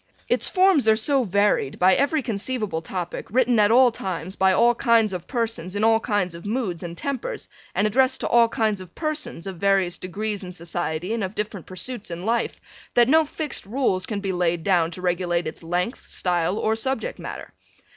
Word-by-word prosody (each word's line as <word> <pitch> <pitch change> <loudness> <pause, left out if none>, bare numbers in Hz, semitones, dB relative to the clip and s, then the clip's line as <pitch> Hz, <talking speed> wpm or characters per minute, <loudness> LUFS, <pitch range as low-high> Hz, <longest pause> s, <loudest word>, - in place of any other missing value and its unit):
Its - - +1
forms 370 - +3
are 220 - +6
so 265 +4 +2
varied 200 - +1
by 185 +1 +5
every 285 +4 +1
conceivable 215 -5 -2
topic 175 +1 -5
written 245 0 +3
at 205 -1 +5
all 245 +2 +6
times 185 -4 -5
by 190 0 +3
all 235 +5 +4
kinds 230 -4 +3
of 180 -2 -5
persons 225 -7 -2
in 205 - -1
all 225 0 +5
kinds 205 -6 -1
of 170 0 -10
moods 205 -6 -2
and 170 -1 -7
tempers 280 - -4 0.3
and 195 - +2
addressed 255 +5 +2
to - - -2
all 235 -1 +5
kinds 215 -4 0
of 185 - -13
persons 305 - -3
of 190 -2 -6
varying 195 -1 +2
degrees 205 +2 -3
in 180 - -7
society 175 +1 -3
and 230 -2 -1
of 190 +2 -4
different 210 -4 -4
pursuits 210 +4 -5
in 175 +2 -6
life, 235 +1 0 0.4
that 240 -1 +6
no 320 +4 +5
fixed 300 -7 -5
rules 210 -5 0
can 215 -5 -3
be 195 -1 -2
laid 175 -2 0
down 175 -3 +2
to 180 +2 -9
regulate 175 -1 0
its 155 - -6
length, 180 +8 -3
style 175 +1 0
or 220 0 +1
subject 265 - -2
matter. - - -8
205 Hz, 195 wpm, -24 LUFS, 180-235 Hz, 0.4 s, are